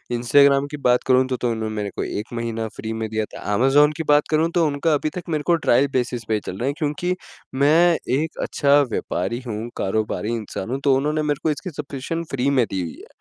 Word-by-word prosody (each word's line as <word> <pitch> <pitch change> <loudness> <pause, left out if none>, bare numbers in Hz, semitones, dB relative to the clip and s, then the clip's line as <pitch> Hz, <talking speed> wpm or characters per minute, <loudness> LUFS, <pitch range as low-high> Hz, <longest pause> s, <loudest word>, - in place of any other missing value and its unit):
Instagram 140 +3 +4
की 150 - -5
बात 125 -3 +2
करूँ 130 0 +4
तो 130 -1 -2
तो 120 - -1
इन्होंने 110 -1 -4
मेरे 105 -1 -2
को - - -2
1 105 +2 -4
महीना 115 -1 -3
फ्री 110 +1 -5
में 110 0 -3
दिया 110 0 -1
था, - - -12
अमेज़न 140 +6 +4
की 160 - -2
बात 145 0 +4
करूँ 160 +2 +2
तो 170 - +4
उनका 150 +2 0
अभी 150 +1 0
तक 180 - -4
मेरे 155 -2 -1
को 170 - +5
ट्रायल 140 -3 +3
बेसिस 125 -2 -1
पे 110 - 0
ही 105 - +1
चल 90 - -5
रहा 125 +6 -2
है 140 - 0
क्योंकि 155 +4 -1 0.4
मैं 160 +5 +4 0.2
एक 160 +2 -3
अच्छा 145 0 +3
व्यापारी 95 +7 -2
हूँ, 110 +1 -4
कारोबारी 110 +2 -1
इंसान 105 -2 -5
हूँ 135 - -1
तो 140 -2 +4
उन्होंने 150 +3 0
मेरे 150 -1 -1
को 160 - +2
इसकी 170 +5 -5
सब्सक्रिप्शन 150 +2 -5
फ्री 135 +1 0
में 130 -4 +3
दी 95 -1 -2
हुई 85 -2 -6
है। - - -14
135 Hz, 235 wpm, -22 LUFS, 115-150 Hz, 0.4 s, को